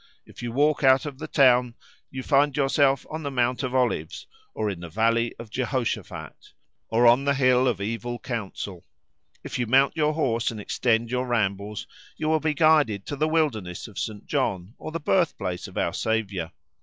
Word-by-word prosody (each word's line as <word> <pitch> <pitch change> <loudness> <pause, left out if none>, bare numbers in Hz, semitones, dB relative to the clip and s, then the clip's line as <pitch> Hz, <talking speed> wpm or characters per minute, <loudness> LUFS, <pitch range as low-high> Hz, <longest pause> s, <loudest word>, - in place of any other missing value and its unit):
If - - -13
you 120 -1 -4
walk 145 +4 +2
out 130 +1 +5
of 140 -2 -7
the 155 - -5
town 125 -5 +4 0.3
you 130 0 -6
find 140 0 +2
yourself 140 0 +2
on 155 +1 -4
the 145 - -3
Mount 125 -1 0
of 130 -1 -3
Olives, 115 -10 -1 0.3
or 110 - -1
in 100 -4 -3
the 85 -1 -8
Valley 115 +5 +1
of 115 -2 -10
Jehoshaphat, 130 -1 -4 0.4
or 115 +2 +3
on 120 +4 +5
the 140 0 +2
Hill 130 -1 +3
of 115 -6 0
Evil 115 +4 -3
Counsel. 105 -6 -5 0.6
If - - -5
you 120 - 0
mount 135 +5 +4
your 155 -1 +1
horse 120 -7 0
and 115 - -6
extend 115 +2 0
your 125 0 -1
rambles 105 -3 -1 0.3
you 155 - -2
will 160 0 +3
be 155 -1 -1
guided 145 - +3
to 145 - -4
the 155 +2 +1
wilderness 125 - -1
of 100 -5 -8
St. 105 +1 -5
John, 95 +2 -2
or 155 - -6
the 165 - -3
birthplace 145 - 0
of - - -11
our - - 0
Saviour. 100 -7 -2
125 Hz, 190 wpm, -25 LUFS, 110-140 Hz, 0.6 s, out